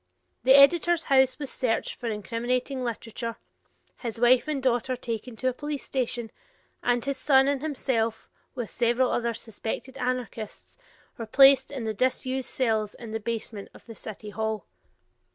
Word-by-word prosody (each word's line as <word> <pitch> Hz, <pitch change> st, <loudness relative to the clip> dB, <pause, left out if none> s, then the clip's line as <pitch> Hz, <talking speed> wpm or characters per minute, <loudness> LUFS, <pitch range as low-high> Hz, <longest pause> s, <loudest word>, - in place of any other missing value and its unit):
The 260 Hz, +2 st, +7 dB
editor's 335 Hz, +4 st, +6 dB
house 265 Hz, -1 st, +5 dB
was 285 Hz, -2 st, -5 dB
searched 235 Hz, -3 st, -1 dB
for 240 Hz, -, -4 dB
incriminating 245 Hz, +5 st, -2 dB
literature, 230 Hz, 0 st, -4 dB, 0.6 s
his 230 Hz, -2 st, -5 dB
wife 245 Hz, +3 st, +5 dB
and 300 Hz, -2 st, -1 dB
daughter 255 Hz, 0 st, +1 dB
taken 235 Hz, -1 st, -5 dB
to 255 Hz, -, -2 dB
a -, -, -3 dB
police 295 Hz, +1 st, -5 dB
station, 240 Hz, -3 st, -2 dB, 0.5 s
and 245 Hz, 0 st, +1 dB
his 275 Hz, -1 st, -1 dB
son 270 Hz, -1 st, +4 dB
and 280 Hz, -1 st, 0 dB
himself, 250 Hz, -7 st, -1 dB, 0.3 s
with 240 Hz, -4 st, -4 dB
several 240 Hz, +2 st, +2 dB
other 235 Hz, -1 st, 0 dB
suspected 230 Hz, +4 st, -6 dB
anarchists, 250 Hz, -4 st, -4 dB, 0.4 s
were 230 Hz, -, -5 dB
placed 270 Hz, +2 st, +6 dB
in 270 Hz, -4 st, -5 dB
the 220 Hz, -1 st, -2 dB
disused 255 Hz, +3 st, -1 dB
cells 220 Hz, -5 st, 0 dB
in 230 Hz, -2 st, -9 dB
the 220 Hz, -, -2 dB
basement 220 Hz, -2 st, -4 dB
of -, -, -16 dB
the 230 Hz, -, -9 dB
city 215 Hz, -1 st, -8 dB
hall. 220 Hz, -2 st, -2 dB
245 Hz, 155 wpm, -27 LUFS, 225-265 Hz, 0.6 s, The